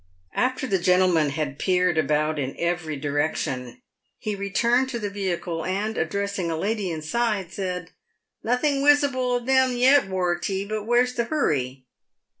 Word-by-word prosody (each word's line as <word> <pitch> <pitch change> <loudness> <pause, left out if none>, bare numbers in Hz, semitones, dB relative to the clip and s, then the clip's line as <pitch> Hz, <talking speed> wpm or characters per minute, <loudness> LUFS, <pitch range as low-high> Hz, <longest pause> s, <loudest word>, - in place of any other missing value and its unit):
After 255 +1 0
the 195 -7 +1
gentleman 180 -4 +3
had 140 -1 -3
peered 180 -2 +2
about 155 0 +1
in 135 -1 -3
every 170 -3 -2
direction, 145 - -2 0.3
he 215 -2 -3
re 200 0 -4
turned 240 +6 +2
to 245 - -3
the 205 -3 -4
vehicle, 175 -4 -3
and, 205 +4 -2
addressing 200 +1 -2
a 165 - -2
lady 205 +2 -1
inside, 190 +4 -1
said, 180 -3 -4 0.3
" - - -57 0.2
Nothing 275 +4 +1
wisible 280 -3 +3
of 240 - -7
them 260 -1 +3
yet, 260 -1 +5
"Wortey; 185 +1 -1
but 215 0 -3
where's 245 +2 +2
the 235 -1 -1
hurry?" 135 - -1
195 Hz, 155 wpm, -24 LUFS, 165-240 Hz, 0.3 s, yet